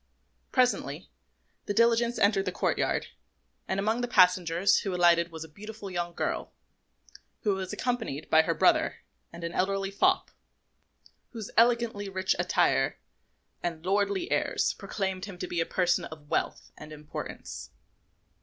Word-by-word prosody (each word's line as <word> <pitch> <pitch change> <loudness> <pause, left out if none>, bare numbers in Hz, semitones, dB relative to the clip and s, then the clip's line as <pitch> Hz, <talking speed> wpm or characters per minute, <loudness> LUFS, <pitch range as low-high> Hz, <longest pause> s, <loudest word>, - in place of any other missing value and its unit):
Presently 250 -1 0 0.6
the 205 - -1
diligence 235 +1 +3
entered 200 -1 +3
the 185 - -1
courtyard, - - 0 0.6
and 190 - -1
amongst 220 +4 0
the 245 - -1
passengers 180 -3 +4
who 195 -3 -3
alighted 170 -1 +4
was 160 -1 -7
a - - -10
beautiful 205 +4 -9
young 175 -1 -3
girl, - - -3 0.9
who 210 -3 +2
was 190 -1 -4
accompanied 225 - -3
by 160 - +6
her - - -1
brother - - +2 0.3
and 170 0 -10
an 170 - -3
elderly 195 +2 0
fop, 375 - +2 1.0
whose 220 -4 -7
elegantly 230 -3 +3
rich 190 0 0
attire - - +2 0.6
and 170 -1 -4
lordly 200 0 0
airs - - +1
proclaimed 190 -2 -3
him 200 -3 -9
to 180 - -4
be 175 -2 -1
a 165 - -1
person 180 -1 +1
of 150 -2 -11
wealth - - -2
and 150 +1 -11
importance. 150 0 -7
190 Hz, 145 wpm, -28 LUFS, 175-215 Hz, 1.0 s, by